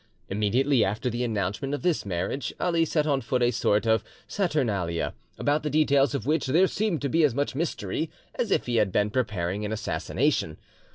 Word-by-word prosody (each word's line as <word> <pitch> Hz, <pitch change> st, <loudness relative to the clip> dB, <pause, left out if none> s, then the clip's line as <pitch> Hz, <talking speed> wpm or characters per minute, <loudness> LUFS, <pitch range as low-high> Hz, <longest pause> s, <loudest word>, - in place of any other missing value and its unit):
Immediately 115 Hz, +6 st, +2 dB
after 110 Hz, +5 st, -1 dB
the 120 Hz, +2 st, -2 dB
announcement 110 Hz, +5 st, -2 dB
of 145 Hz, -, -8 dB
this 175 Hz, -, 0 dB
marriage 95 Hz, +8 st, -2 dB
Ali 170 Hz, -2 st, +2 dB
set 150 Hz, -1 st, 0 dB
on 140 Hz, -3 st, +1 dB
foot 125 Hz, +1 st, 0 dB
a 120 Hz, -, +3 dB
sort 105 Hz, 0 st, +1 dB
of 110 Hz, 0 st, +3 dB, 0.2 s
saturnalia, 110 Hz, -, -1 dB, 0.2 s
about 145 Hz, +2 st, +1 dB
the 150 Hz, -, -2 dB
details 140 Hz, -3 st, +3 dB
of 140 Hz, -, -3 dB
which 155 Hz, 0 st, +1 dB
there 165 Hz, +8 st, +4 dB
seemed 195 Hz, -6 st, -1 dB
to -, -, +1 dB
be 160 Hz, +4 st, +2 dB
as 140 Hz, -6 st, +3 dB
much 145 Hz, +1 st, -1 dB
mystery 150 Hz, -, -2 dB, 0.2 s
as -, -, -2 dB
if -, -, +1 dB
he 120 Hz, -1 st, 0 dB
had 105 Hz, -3 st, +2 dB
been 105 Hz, +2 st, +1 dB
preparing 105 Hz, -5 st, -1 dB
an 105 Hz, -, -3 dB
assassination. 110 Hz, 0 st, -1 dB
130 Hz, 190 wpm, -26 LUFS, 105-150 Hz, 0.2 s, there